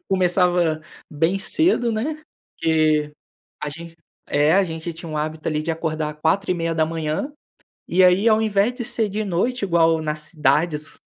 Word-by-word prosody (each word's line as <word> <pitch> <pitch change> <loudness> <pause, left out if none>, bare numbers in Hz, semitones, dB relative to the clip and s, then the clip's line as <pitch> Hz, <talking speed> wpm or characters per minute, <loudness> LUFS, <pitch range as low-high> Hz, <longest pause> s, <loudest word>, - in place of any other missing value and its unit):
começava 180 -3 +2 0.3
bem 165 +6 0
cedo, 245 - +2
né. 300 +8 -3 0.4
Que 155 -2 +2 0.5
a 150 - -2
gen 165 +3 -9 0.3
é 145 +2 +2
a 195 +1 +4
gente 165 0 -5
tinha 165 +1 -9
o 155 - -4
hábito 155 +1 -3
ali, 155 -1 -1
de 165 - -2
acordar 155 -2 -3
4h30 165 - -1 0.5
e 185 +2 +3
aí, 185 +4 +5
ao 220 -1 +4
invés 215 +1 +2
de 245 - -5
ser 225 -1 -1
de 210 +2 -3
noite 210 +7 -1
igual 165 -3 +3
nas 155 -1 -2
cidades 150 0 0
165 Hz, 150 wpm, -22 LUFS, 155-195 Hz, 0.5 s, aí